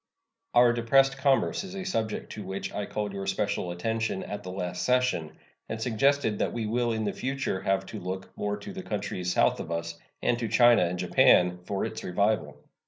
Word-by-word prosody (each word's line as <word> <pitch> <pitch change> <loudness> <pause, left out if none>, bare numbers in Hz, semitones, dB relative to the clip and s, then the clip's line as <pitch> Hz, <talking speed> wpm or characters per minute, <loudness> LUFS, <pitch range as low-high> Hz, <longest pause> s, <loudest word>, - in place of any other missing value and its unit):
Our 120 0 +6
depressed 135 +4 +3
commerce 135 +6 +2
is 190 0 -8
a 195 - -4
subject 110 - -2
to 105 - -6
which 95 +1 -5
I 105 - -3
called 105 -2 -3
your 100 -1 -5
special 100 -2 -1
attention 110 +3 -2
at 105 - -5
the 90 - -8
last 90 -1 -4
session, 125 -11 +1 0.4
and 110 - -3
suggested 120 -1 +1
that - - 0
we 115 -2 -2
will 120 +2 0
in 110 -1 -1
the 100 - -1
future 135 -7 -2
have 95 0 0
to 110 - -7
look 95 +1 -6
more 105 0 -2
to 195 - -8
the 190 - -6
countries 95 - -3
south - - +3
of - - -6
us, 85 0 -4 0.2
and 120 -1 +2
to 115 - -1
China 120 -1 +5
and 90 +1 -2
Japan, 90 0 +4
for 100 +1 -2
its - - -6
revival. 100 +3 0
105 Hz, 200 wpm, -28 LUFS, 95-120 Hz, 0.4 s, Our